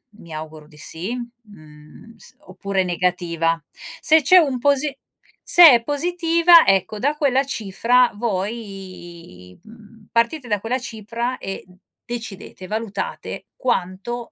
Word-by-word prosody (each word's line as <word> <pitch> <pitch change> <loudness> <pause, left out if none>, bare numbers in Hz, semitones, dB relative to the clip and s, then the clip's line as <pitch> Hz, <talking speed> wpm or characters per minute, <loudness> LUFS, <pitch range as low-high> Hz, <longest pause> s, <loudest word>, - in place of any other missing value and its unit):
mi 170 -6 -15
auguro 155 0 -8
di 150 - -19
sì, 170 +8 -6
mhmm, 210 -6 -13
s - - -17
oppure 190 +1 -3
negativa. 170 -2 -1 0.4
Se 315 0 +4
c'è 365 +7 +6
un 275 -7 +3
posi 285 +2 +1 0.5
se 345 -5 +8
è 235 -1 +3
positiva 335 +3 +4
ecco 195 +2 +1
da 290 +6 0
quella 275 -3 +2
cifra 240 0 +1
voi, 185 - -6
mhmm, 220 -1 -17
partite 240 +4 0
da 210 -2 0
quella 250 +3 -2
cifra 235 +2 -5
e 195 -1 -7 0.4
decidete, 225 -5 -8
valutate 210 -1 -5
quanto 235 - -3
225 Hz, 120 wpm, -21 LUFS, 185-255 Hz, 0.5 s, se